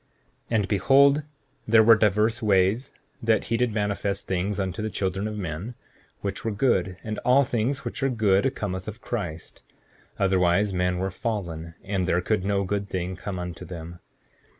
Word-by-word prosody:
7:24 115 - 0
And 100 -3 0
behold, 140 +8 +4 0.4
there 110 0 +6
were 115 +1 +8
divers 105 +2 +2
ways 105 +4 +2 0.3
that 110 -2 +2
he 115 - -1
did 125 -1 +1
manifest 105 -1 -2
things 95 +2 -1
unto 95 +2 -2
the 110 - -2
children 95 0 -2
of 105 0 -5
men, 95 +5 -5 0.5
which 100 -1 -4
were 115 - -1
good; 100 -5 +1
and 110 -1 -4
all 130 +3 +4
things 125 +1 -1
which - - -5
are 135 - +2
good 110 +1 +2
cometh 95 -2 -4
of 110 +2 -6
Christ; 90 -11 -5 0.6
otherwise 95 +1 +2
men 90 0 0
were 95 +1 -2
fallen, 85 -6 -4
and 95 -2 -1
there 90 - +2
could 100 +2 0
no 100 0 +1
good 100 +1 -2
thing 90 0 -3
come 95 +1 -5
unto 90 -1 -6
them. 85 -1 -8
100 Hz, 175 wpm, -25 LUFS, 95-110 Hz, 0.6 s, were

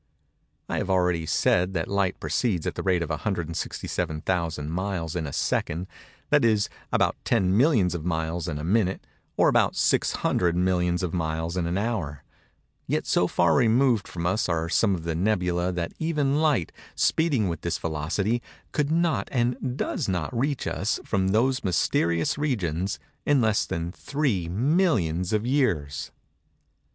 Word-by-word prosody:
I - - -2
have - - -3
already 90 -3 +1
said 90 +4 +2
that 80 - -1
light 100 -1 0
proceeds 100 -10 0
at - - -1
the - - -4
rate 90 -3 +1
of 80 - -5
167,000 80 -2 -2
miles 90 -2 -3
in 80 -4 -2
a - - -5
second—that 95 - -2
is, 110 -3 +3 0.2
about - - +2
10 95 -5 +2
millions 115 - +3
of 85 -3 -4
miles 80 0 -2
in 80 -3 -3
a 75 - -5
minute, 95 +1 +1 0.3
or - - +5
about - - +3
600 85 -1 +1
millions 90 0 +1
of 85 - -2
miles 80 0 -2
in 90 -2 -1
an 85 +2 -1
hour:—yet 100 - -5
so 90 - +2
far 85 - +3
removed 120 -2 +3
from 85 -1 -5
us 95 +3 +1
are 85 -1 0
some 100 +2 +3
of 85 - -6
the 85 0 -2
"nebulæ" 90 -1 0
that 85 -1 -3
even 150 -3 +1
light, 145 - +2 0.2
speeding 145 - +2
with 85 -3 -3
this 85 - -1
velocity, 90 +9 -1 0.3
could 150 -1 0
not 165 -10 +1
and 125 +1 -1
does 130 - -2
not 90 +4 -2
reach 135 +3 -1
us, 100 - -1
from 95 -3 0
those 125 +6 +2
mysterious 85 - +1
regions, 95 - -1 0.3
in 145 -2 +3
less 110 -3 +2
than 85 +1 -3
3 110 - -1
millions 105 - +1
of 110 +1 0
years. 90 - 0
95 Hz, 155 wpm, -26 LUFS, 85-115 Hz, 0.3 s, or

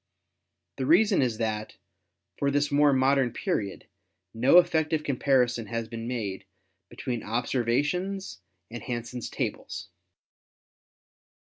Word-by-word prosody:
The 130 - -2
reason 195 +4 +5
is 120 -4 0
that, 110 -2 -3 0.6
for 140 - +2
this 145 +1 +1
more 145 0 +5
modern 135 -1 +3
period, 100 -3 -3 0.5
no 125 +9 +5
effective 160 -3 +3
comparison 125 -5 +1
has 115 +1 -3
been 115 0 -6
made 105 -7 -4 0.4
between 120 -4 -4
observations 135 - -1 0.3
and 120 - -6
Han 120 -3 -3
sen's 120 0 -6
tables." - - -4
125 Hz, 110 wpm, -27 LUFS, 115-145 Hz, 0.6 s, reason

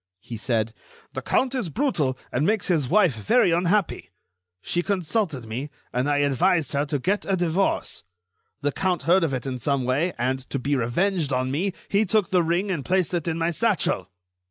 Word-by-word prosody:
He 115 +3 -8
said: 110 0 -1 0.4
"The - - -4
count 260 0 +1
is 250 -10 -2
brutal 155 - 0
and 130 - 0
makes 205 +2 +1
his 155 -8 +1
wife 185 -6 +4
very 120 - +2
unhappy. 180 +3 +1 0.5
She 175 - 0
consulted 180 - -1
me, 125 +7 -5 0.2
and 125 +3 0
I 145 - +2
advised 155 +2 +1
her 145 +1 0
to 145 0 0
get 195 +9 0
a 195 - 0
divorce. 175 +2 0 0.6
The 145 0 0
count 180 -1 -1
heard 175 +4 +4
of 160 - +1
it 130 -2 -3
in 130 -2 -3
some 140 +2 0
way, 145 +8 +1
and, 130 +2 0
to - - -2
be 140 +2 0
revenged 150 +6 0
on 130 0 0
me, 180 +7 -1
he 205 +2 +2
took 210 -1 +1
the 180 -1 +4
ring 175 +4 0
and 160 -7 -2
placed 185 +1 0
it 170 -2 -1
in 165 -1 -1
my 165 +1 0
satchel." 180 - 0
165 Hz, 195 wpm, -24 LUFS, 130-190 Hz, 0.6 s, wife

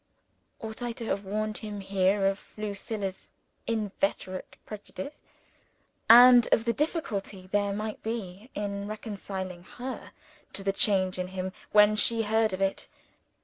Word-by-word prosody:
Ought 220 +1 -7
I 240 -1 -2
to 230 0 -6
have 200 -2 -2
warned 215 +2 -2
him 210 -1 -6
here 195 0 +2
of 195 +1 -1
Lucilla's 205 -2 -4 0.4
inveterate 200 -4 -2
prejudice, 210 +5 -8 0.9
and 245 0 +10
of 225 - +4
the 235 - +2
difficulty 215 - -2
there 205 0 +2
might 215 +1 -4
be 220 -1 -5
in 200 -1 -3
reconciling 195 -4 -5
her 250 +8 -7 0.4
to 195 - -3
the 195 0 +1
change 190 -2 +2
in 180 - -1
him 185 0 -4 0.2
when 210 0 +6
she 225 +2 +2
heard 220 0 +2
of 185 +1 -4
it? 195 0 0
205 Hz, 140 wpm, -28 LUFS, 195-220 Hz, 0.9 s, and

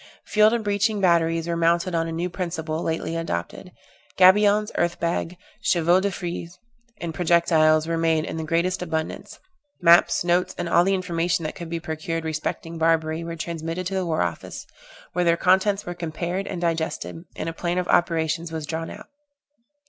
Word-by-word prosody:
Field 215 0 +4
and 235 -1 -1
breaching 205 +1 +1
batteries 165 -2 +2
were 170 - -1
mounted 170 +2 +1
on 165 0 0
a - - -4
new 170 +2 -2
principle 170 -3 -4
lately 165 0 -2
adopted; 165 - -4 0.5
gabions, 205 +3 +5
earth 170 0 0
bags, 170 +1 -2 0.3
chevaux 175 +1 +3
de 200 +1 0
frise, 175 -1 -6 0.4
and 170 -1 -5
projectiles 160 -2 +3
were 165 0 -1
made 160 -1 +2
in - - -5
the 160 - -3
greatest 170 +3 0
abundance 160 -2 -4 0.4
maps, 170 0 +5
notes, 175 +1 +1
and 175 - -3
all 170 +1 +4
the 195 +2 +2
information 175 -2 -1
that 155 - -3
could 170 -1 -8
be 170 0 -3
procured 165 0 -4
respecting 160 +1 -4
Barbary 160 0 +1
were 165 0 -5
transmitted 165 +2 -4
to 190 - -3
the 190 -1 0
war 160 -1 +1
office, 85 -1 -5 0.5
where 180 - +1
their 170 -1 +3
contents 190 +3 +2
were 175 - -4
compared 175 +3 -4
and 185 - -4
digested, 165 -1 -2
and - - -4
a 165 - -3
plan 175 +1 -2
of 180 -1 -1
operations 165 -1 +1
was 160 -2 -4
drawn 165 +1 -4
out. - - -10
170 Hz, 180 wpm, -24 LUFS, 165-180 Hz, 0.5 s, gabions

